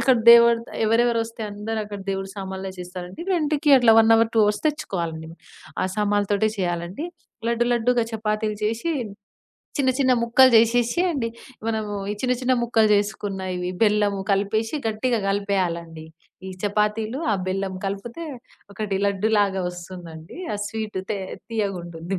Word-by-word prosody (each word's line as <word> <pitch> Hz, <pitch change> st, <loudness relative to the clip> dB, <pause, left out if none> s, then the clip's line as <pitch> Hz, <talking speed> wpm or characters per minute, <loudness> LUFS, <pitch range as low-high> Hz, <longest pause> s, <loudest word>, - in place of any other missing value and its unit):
అక్కడ 260 Hz, -2 st, +4 dB
దేవుడు, 235 Hz, 0 st, +7 dB, 0.2 s
ఎవరెవరు 230 Hz, +1 st, +3 dB
వస్తే 230 Hz, 0 st, -8 dB
అందరూ 210 Hz, +2 st, -4 dB
అక్కడ 205 Hz, -1 st, -7 dB
దేవుడి 195 Hz, 0 st, -3 dB
సామాన్లు 190 Hz, 0 st, -5 dB
చేస్తారండి. 180 Hz, -, -7 dB
రెంట్‌కి 300 Hz, -3 st, +2 dB
అట్లా 230 Hz, -2 st, +6 dB
1 225 Hz, 0 st, +5 dB
అవర్, 225 Hz, 0 st, +2 dB
2 220 Hz, -, +6 dB
అవర్స్ 210 Hz, 0 st, -1 dB
తెచ్చుకోవాలండి. 170 Hz, -, -4 dB, 0.5 s
ఆ 185 Hz, -, +1 dB
సామాన్లతోటే 205 Hz, 0 st, +1 dB
చేయాలండి. 175 Hz, -, -2 dB, 0.4 s
లడ్డు, 235 Hz, 0 st, +1 dB
లడ్డులాగా 240 Hz, 0 st, +2 dB
చపాతీలు 215 Hz, -1 st, -2 dB
చేసి 230 Hz, +9 st, -1 dB, 0.9 s
చిన్న 260 Hz, -2 st, +3 dB
చిన్న 260 Hz, -2 st, +4 dB
ముక్కలు 255 Hz, +3 st, +6 dB
జేసేసి 235 Hz, +6 st, +4 dB
అండి. 270 Hz, -9 st, -1 dB, 0.4 s
మనము 220 Hz, -2 st, -2 dB, 0.2 s
ఈ -, -, 0 dB
చిన్న 250 Hz, -1 st, +1 dB
చిన్న 255 Hz, 0 st, +2 dB
ముక్కలు 225 Hz, -2 st, +3 dB
చేసుకున్నవి 190 Hz, -3 st, -2 dB
బెల్లం 210 Hz, -1 st, +3 dB, 0.2 s
కలిపేసి 215 Hz, +6 st, 0 dB
గట్టిగా 225 Hz, +2 st, 0 dB
కలిపేయాలండి. 175 Hz, -5 st, -2 dB, 0.4 s
ఈ -, -, -5 dB
చపాతీలు, 210 Hz, +4 st, 0 dB
ఆ -, -, +3 dB
బెల్లం 190 Hz, 0 st, -2 dB
కలిపితే 215 Hz, +11 st, -5 dB, 0.5 s
ఒకటి 200 Hz, -2 st, -2 dB
లడ్డులాగా 200 Hz, -1 st, +1 dB
వస్తుందండి. 175 Hz, -, -10 dB, 0.2 s
ఆ -, -, -2 dB
స్వీట్ 215 Hz, -3 st, -4 dB
తే 205 Hz, -, -1 dB, 0.3 s
తియ్యగా 205 Hz, -5 st, -2 dB
ఉంటుంది. 170 Hz, +2 st, -5 dB
210 Hz, 140 wpm, -23 LUFS, 190-230 Hz, 0.9 s, దేవుడు